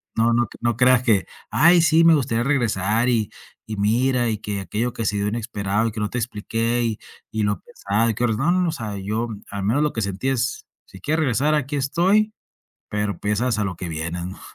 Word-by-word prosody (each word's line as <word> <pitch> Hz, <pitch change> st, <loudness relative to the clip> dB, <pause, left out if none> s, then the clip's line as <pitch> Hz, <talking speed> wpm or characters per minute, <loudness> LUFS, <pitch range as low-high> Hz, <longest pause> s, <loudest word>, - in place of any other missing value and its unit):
no 115 Hz, +1 st, +3 dB
no 120 Hz, 0 st, +3 dB, 0.2 s
no 120 Hz, -1 st, +1 dB
creas 125 Hz, 0 st, +4 dB
que: 110 Hz, -6 st, +3 dB, 0.3 s
"Ay, 175 Hz, +2 st, +6 dB
sí, 165 Hz, 0 st, +4 dB
me 165 Hz, -1 st, +7 dB
gustaría 120 Hz, -4 st, 0 dB
regresar, 115 Hz, -4 st, +1 dB
y 110 Hz, -4 st, 0 dB, 0.4 s
y 110 Hz, -1 st, -5 dB
mira, 120 Hz, +4 st, +2 dB
y 110 Hz, -, -1 dB
que 100 Hz, -1 st, -4 dB
aquello 115 Hz, +5 st, -2 dB
que 115 Hz, -, -4 dB
se 105 Hz, -, 0 dB
dio 100 Hz, +1 st, 0 dB
inesperado 105 Hz, -1 st, -1 dB
y -, -, -8 dB
que 110 Hz, -, -4 dB
no 105 Hz, -, -1 dB
te -, -, -4 dB
expliqué, 115 Hz, +1 st, -1 dB
y 110 Hz, -2 st, -2 dB, 0.3 s
y 110 Hz, -1 st, -1 dB
lo 105 Hz, 0 st, -1 dB
pesado 110 Hz, +3 st, -1 dB
que: 120 Hz, +2 st, +1 dB
"No, 170 Hz, +11 st, +1 dB
o -, -, 0 dB
sea, 105 Hz, -8 st, -5 dB
yo 110 Hz, +4 st, -2 dB, 0.2 s
al 100 Hz, -1 st, -4 dB
menos 130 Hz, +9 st, +2 dB
lo 150 Hz, -, 0 dB
que 115 Hz, -, -2 dB
sentí 100 Hz, +5 st, -3 dB
es: 130 Hz, -1 st, -1 dB, 0.2 s
"Si 95 Hz, -, -14 dB
quieres 155 Hz, +6 st, 0 dB
regresar 145 Hz, +3 st, +2 dB
aquí 145 Hz, 0 st, -1 dB
estoy, 190 Hz, +10 st, +2 dB, 0.6 s
pero 105 Hz, -3 st, -2 dB
pesas 105 Hz, +3 st, 0 dB
a 105 Hz, -, +1 dB
lo 95 Hz, -, -3 dB
que 90 Hz, -, -6 dB
vienen", 85 Hz, +3 st, -4 dB
¿no? -, -, -13 dB
115 Hz, 215 wpm, -22 LUFS, 105-130 Hz, 0.6 s, me